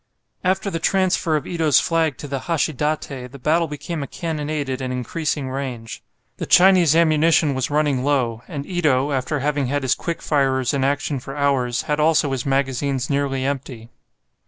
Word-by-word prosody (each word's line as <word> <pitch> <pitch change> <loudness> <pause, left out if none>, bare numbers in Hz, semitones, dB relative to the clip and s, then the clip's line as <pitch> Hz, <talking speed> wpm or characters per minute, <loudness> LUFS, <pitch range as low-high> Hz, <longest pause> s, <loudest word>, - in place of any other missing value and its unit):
After 190 +2 0
the 165 - -2
transfer 185 -2 +1
of 150 - -2
Ito's 160 -4 +3
flag 160 -5 0
to 145 - -7
the 140 -1 -3
"Hashidate" 150 -5 -1
the 140 - -10
battle 160 +5 +1
became 150 +2 -5
a 140 - -4
cannonade 150 -3 -3
at 130 0 -3
an 130 -1 -3
increasing 135 +2 -3
range. 125 -4 -5 0.4
The - - -5
Chinese 180 -4 +6
ammunition 160 -2 +3
was 130 -1 -2
running 145 -3 +1
low, 125 -5 0
and 145 -5 -5
Ito, 150 -6 +1
after 135 +2 -1
having 145 -1 0
had 145 +2 -1
his 130 - +2
quick 170 -1 -4
firers 135 -3 +1
in 135 -2 0
action 140 0 0
for 135 +3 -8
hours, 130 -4 +1
had 150 0 -1
also 150 -2 +3
his 135 0 -3
magazines 135 0 0
nearly 140 -2 0
empty. 130 -4 -4
145 Hz, 175 wpm, -21 LUFS, 130-155 Hz, 0.4 s, Chinese